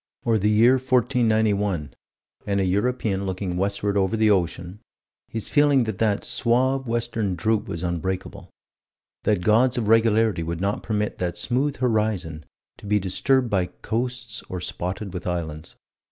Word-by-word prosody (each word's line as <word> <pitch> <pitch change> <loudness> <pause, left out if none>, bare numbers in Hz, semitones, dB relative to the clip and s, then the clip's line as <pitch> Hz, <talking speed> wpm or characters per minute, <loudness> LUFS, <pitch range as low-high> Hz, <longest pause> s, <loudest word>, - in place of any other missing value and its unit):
Or 115 -2 +2
the 105 +2 +2
year 115 +5 +5
1491 110 - +1 0.5
and 100 -1 +1
a 95 - +1
European 100 0 0
looking 95 -1 -3
westward 100 +2 -1
over 95 +2 +1
the 110 -1 +4
ocean 90 0 -1 0.5
his 110 -2 -5
feeling 145 -3 +4
that 110 -4 -4
that 105 -2 +1
suave 130 +3 +1
western 115 -4 -1
droop 110 +3 0
was 85 +1 -5
unbreakable; 95 +2 -4 0.8
that 105 -4 +2
gods 120 +5 +3
of 115 -3 -1
regularity 110 -4 +3
would 80 0 -3
not 100 +2 -1
permit 105 -1 -2
that 90 -1 -2
smooth 135 +4 0
horizon 105 - -1 0.3
to - - -10
be 105 +1 +3
disturbed 120 +6 +1
by 95 -3 +1 0.2
coasts 120 -1 -3
or 90 - -4
spotted 90 +2 -4
with 90 -1 -5
islands. 80 -2 -4
105 Hz, 150 wpm, -24 LUFS, 95-115 Hz, 0.8 s, year